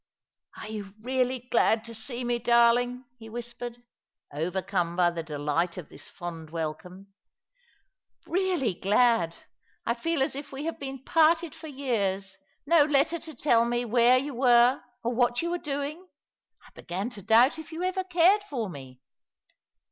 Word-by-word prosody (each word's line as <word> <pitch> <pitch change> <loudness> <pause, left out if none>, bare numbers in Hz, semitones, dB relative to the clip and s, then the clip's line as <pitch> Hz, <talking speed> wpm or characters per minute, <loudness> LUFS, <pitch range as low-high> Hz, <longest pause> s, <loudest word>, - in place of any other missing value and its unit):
" - - -26
Are - - -8
you 205 -2 -7
really 255 0 0
glad 225 -1 +3
to 230 - -9
see 240 +3 -5
me, 240 0 0
darling? 240 +2 +3
" 245 - -46
he 225 -1 -11
whispered, 240 +1 -7 0.5
overcome 175 +2 -2
by 175 -1 +3
the 170 -1 -4
delight 155 +3 -2
of 180 - -8
this - - -12
fond 165 -3 -8
welcome. 170 +5 -6 0.6
" - - -40
Really 355 - 0
glad. 200 -2 +2 0.5
I 235 - +1
feel 290 +4 0
as 270 - -2
if 280 0 -7
we 275 +2 -6
had 330 - -4
been 270 -1 -6
parted 325 +1 +3
for 320 - -10
years. 200 -10 -2 0.3
No 320 0 +5
letter 295 +3 +2
to 315 -2 -10
tell 235 -3 +3
me 240 +1 -1
where 240 +2 +5
you 280 +2 -3
were 245 0 +4 0.2
or 235 +1 -1
what 240 +3 +1
you 340 - -1
were 350 - -1
doing! 295 +5 -4 0.6
I - - -18
began 195 +7 -5
to 210 - -10
doubt 230 - +4
if 315 - -10
you 325 +2 -4
ever 370 +1 -1
cared 370 +3 +4
for 230 -9 -3
me." 130 -4 -11
240 Hz, 170 wpm, -27 LUFS, 195-280 Hz, 0.6 s, No